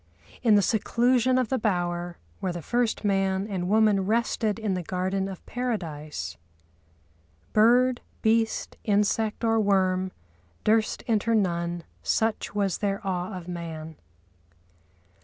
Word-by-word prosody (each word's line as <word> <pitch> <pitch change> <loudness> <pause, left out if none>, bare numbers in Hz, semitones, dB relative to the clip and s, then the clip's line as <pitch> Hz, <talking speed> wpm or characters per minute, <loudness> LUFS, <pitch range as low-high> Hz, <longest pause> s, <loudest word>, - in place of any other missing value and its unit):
In 225 -4 +5
the 205 - +4
seclusion 245 +4 +2
of 255 -4 +1
the 265 - 0
bower, 175 -4 -1 0.2
where 185 - -1
the 175 -2 -6
first 240 -2 0
man 195 -1 +1
and 185 -4 -3
woman 210 -3 +3
rested 220 -1 +1
in 215 -3 -1
the 180 - -1
garden 190 +2 -2
of 190 - -9
Paradise— 170 -12 -4 1.2
Bird, 245 +3 +4 0.2
beast, 225 0 +1
insect 210 +2 +1
or 225 -1 +3
worm 190 -2 +2 0.5
Durst 220 0 +2
enter 230 0 +1
none, 170 -4 0 0.2
such 220 -2 0
was 200 -3 0
their 200 -1 -1
awe 185 +1 -2
of 175 -1 -9
man. 160 -2 -6
200 Hz, 125 wpm, -26 LUFS, 180-225 Hz, 1.2 s, In